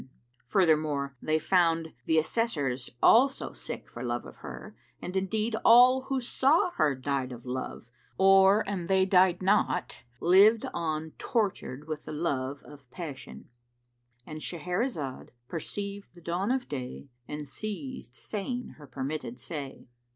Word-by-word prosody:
[FN#367] - - -16 0.4
Furthermore, 155 -6 +2
they 155 0 +1
found 165 -1 +2
the 160 - +3
Assessors 155 - 0
also 265 +4 +5
sick - - -7
for - - -9
love - - -2
of - - -12
her, - - -9 0.2
and 180 - -6
indeed 215 +4 0
all 250 +3 +7
who 270 0 -1
saw 275 +7 +2
her 150 - +1
died 130 0 -2
of 120 -1 -9
her 125 - -8
love 125 -2 -5 0.3
or, 195 +2 +6
an 190 -4 -3
they 190 0 +3
died 185 -1 +4
not, 200 +3 +1 0.2
lived 200 +6 +5
on 160 -1 -2
tortured 190 - -2
with 155 -2 -5
the - - -6
lowe 145 -4 -2
of 140 -4 -15
passion.— 145 -4 -8 0.8
And 155 0 -7
Shahrazad 175 - -3 0.2
perceived 200 +5 -6
the 175 - -14
dawn 175 +5 -2
of 260 0 0
day 130 0 -6 0.2
and 150 0 -6
ceased 215 - -6
saying 240 +4 -4
her 145 - -12
permitted 130 -1 -5
say. 140 +1 -7
170 Hz, 145 wpm, -29 LUFS, 145-205 Hz, 0.8 s, all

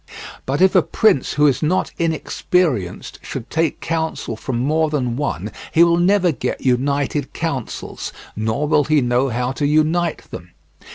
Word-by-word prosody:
But 140 +5 0
if 190 0 +5
a - - +6
prince 210 - +2
who 150 - +3
is 140 -3 +2
not 170 +4 0
inexperienced 160 - -1
should 115 - -7
take 160 -1 0
counsel 160 -7 -2
from 120 +2 -4
more 155 +5 +1
than 125 -6 -1
one 105 - -3 0.2
he 165 - +6
will 170 0 +4
never 185 0 +3
get 125 -3 -3
united 140 +2 0
counsels, 140 -8 -4 0.2
nor 110 +7 -1
will 150 -2 +3
he 155 +1 +3
know 125 +2 +1
how 125 +2 -1
to 145 +2 -1
unite 155 +3 +1
them. 90 -1 -9
145 Hz, 160 wpm, -20 LUFS, 125-165 Hz, 0.2 s, a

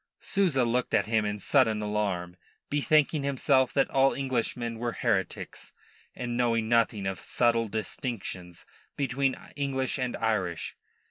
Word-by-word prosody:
Souza 170 - +1
looked 125 +2 0
at - - +3
him 110 -1 +1
in 105 0 -2
sudden 110 0 +3
alarm, 100 -4 -2 0.4
bethinking 150 +1 +3
himself 135 -1 +2
that 135 - +2
all 135 0 +4
Englishmen 120 -3 -2
were 120 0 -2
heretics, - - -2 0.4
and 120 -1 -3
knowing 115 -2 +1
nothing 115 -3 +2
of 95 -1 -2
subtle 115 -1 +1
distinctions 105 -5 -5 0.3
between 135 -1 0 0.2
English 135 -2 -1
and 125 -1 -2
Irish. 95 -7 -1
120 Hz, 130 wpm, -28 LUFS, 105-135 Hz, 0.4 s, all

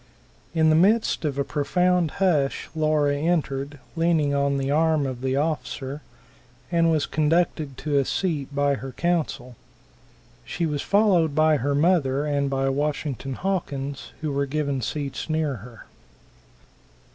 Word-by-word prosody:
In 160 -1 +4
the - - +4
midst 200 +2 +3
of 140 -2 -2
a 140 - +1
profound 180 +4 +1
hush 160 -8 +1
Laura 155 -2 +2
entered, 145 -3 -1 0.2
leaning 165 -3 +2
on 140 0 +1
the 135 0 -1
arm 155 -1 +2
of 130 -2 -4
the 130 0 0
officer, 140 -1 -2 0.7
and 165 -1 +3
was 155 -3 +2
conducted 155 -3 0
to 145 -2 0
a - - +2
seat 155 -6 -1
by 145 0 +1
her 135 -1 -6
counsel. 155 -8 -1 0.9
She 170 - -3
was 150 -3 -2
followed 185 -8 +3
by 155 0 +4
her 140 +2 0
mother 145 -3 +2
and 140 -2 0
by 135 0 0
Washington 140 -1 -2
Hawkins, 145 -7 -3
who 155 -2 -2
were 140 0 0
given 140 -2 -1
seats 145 +3 -4
near 155 -4 0
her. 115 +2 -13
145 Hz, 145 wpm, -24 LUFS, 140-160 Hz, 0.9 s, In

